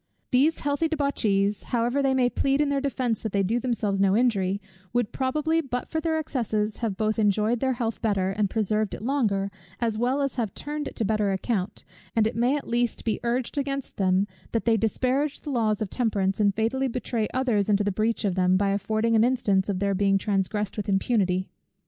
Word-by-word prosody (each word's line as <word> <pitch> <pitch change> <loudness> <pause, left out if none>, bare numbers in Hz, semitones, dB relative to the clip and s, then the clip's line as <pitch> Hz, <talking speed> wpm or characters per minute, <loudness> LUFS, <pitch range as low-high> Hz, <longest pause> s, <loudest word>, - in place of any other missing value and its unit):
These 285 +5 +3
healthy 285 +3 0
debauchees, 210 -10 0
however 240 +3 0
they 270 -1 +2
may 255 -1 +3
plead 275 +2 +1
in 295 -1 +2
their 280 -1 0
defence 255 -5 -1
that 220 - -4
they 200 -1 +2
do 225 +6 +1
themselves 220 -5 -1
no 195 +1 +4
injury, 200 -6 +1 0.3
would 240 -3 0
probably, 305 +5 0
but 250 -4 -4
for 320 - -1
their 320 -1 0
excesses, 220 -8 -1
have 220 -5 -2
both 215 +1 0
enjoyed 215 +3 +2
their 260 +1 +1
health 230 -2 -3
better, 195 -4 +1
and 205 0 0
preserved 215 -1 0
it - - -10
longer, 215 -7 0 0.3
as 225 -2 -1
well 260 +4 +1
as 275 -1 -2
have 220 -6 -2
turned 295 0 -4
it - - -8
to 225 - 0
better 210 -1 +1
account; 195 0 -2 0.3
and 225 -1 +4
it 225 - -1
may 245 +5 +2
at 285 - -7
least 240 0 -1
be 225 - 0
urged 245 +3 -1
against 275 -1 -3
them, 190 0 +2 0.3
that 230 - 0
they 230 -1 +4
disparage 255 +7 0
the 295 - -5
laws 220 -4 +1
of 195 - -7
temperance, 200 -5 0
and 200 -2 +3
fatally 260 +5 0
betray 235 -3 -2
others 235 -6 +1
into 205 0 +3
the 205 - 0
breach 215 +3 0
of 195 - +1
them, 185 0 +3
by 200 0 +1
affording 215 +3 +1
an 220 - +5
instance 205 -6 +1
of 195 - 0
their 200 +1 0
being 195 0 +3
transgressed 200 +1 -1
with 210 -1 -3
impunity. 195 -2 +1
225 Hz, 210 wpm, -26 LUFS, 200-255 Hz, 0.3 s, an